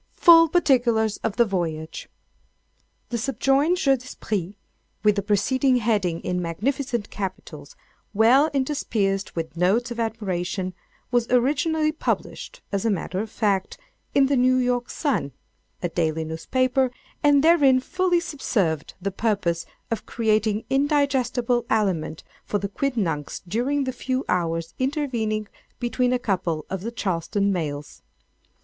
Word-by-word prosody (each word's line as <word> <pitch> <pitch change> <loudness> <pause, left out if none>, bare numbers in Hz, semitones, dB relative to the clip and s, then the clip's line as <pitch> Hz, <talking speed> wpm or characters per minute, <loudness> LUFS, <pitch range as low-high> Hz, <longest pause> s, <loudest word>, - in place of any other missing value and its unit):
Full 330 -2 +7
Particulars 240 - +2
of 220 - -3
the 235 - +4
Voyage! 165 -6 -3 1.0
The 235 - -2
subjoined 275 +6 +2
jeu 275 -6 +3
d'esprit 210 -6 -4 0.5
with 210 -1 +4
the 200 - 0
preceding 255 +7 +2
heading 210 -8 0
in 180 0 -2
magnificent 235 - -2
capitals, 170 -7 -6 0.4
well 240 +8 +5
interspersed 230 -8 -1
with 165 -1 -4
notes 205 +8 +1
of 240 - -5
admiration, 190 -4 -2 0.4
was 240 -1 +1
originally 305 +5 +2
published, - - -4
as 200 -2 -1
matter 190 -2 -1
of 220 +2 -3
fact, 200 -3 -1 0.4
in 275 - +6
the 275 +1 +2
"New 255 0 +4
York 245 -1 0
Sun," 270 - -1 0.5
a 175 - 0
daily 160 -1 -1
newspaper, 255 +11 0 0.3
and 290 -1 +4
therein 290 -6 +5
fully 365 +5 +1
subserved 190 - -2
the 195 +2 -2
purpose 190 -5 -1 0.2
of 230 - -3
creating 215 -1 +1
indigestible 270 -4 +1
aliment 180 -8 0 0.2
for 205 - -1
the 200 0 -3
quidnuncs 195 - -2
during 260 +9 0
the 260 -1 -3
few 260 +1 -2
hours 165 -2 -1
intervening 245 -7 -1 0.3
between 245 +1 0
a 250 - +3
couple 180 -9 -2
of 190 -2 -3
the 230 +4 -4
Charleston 200 -1 -1
mails. 150 -4 -4
225 Hz, 130 wpm, -24 LUFS, 185-265 Hz, 1.0 s, Full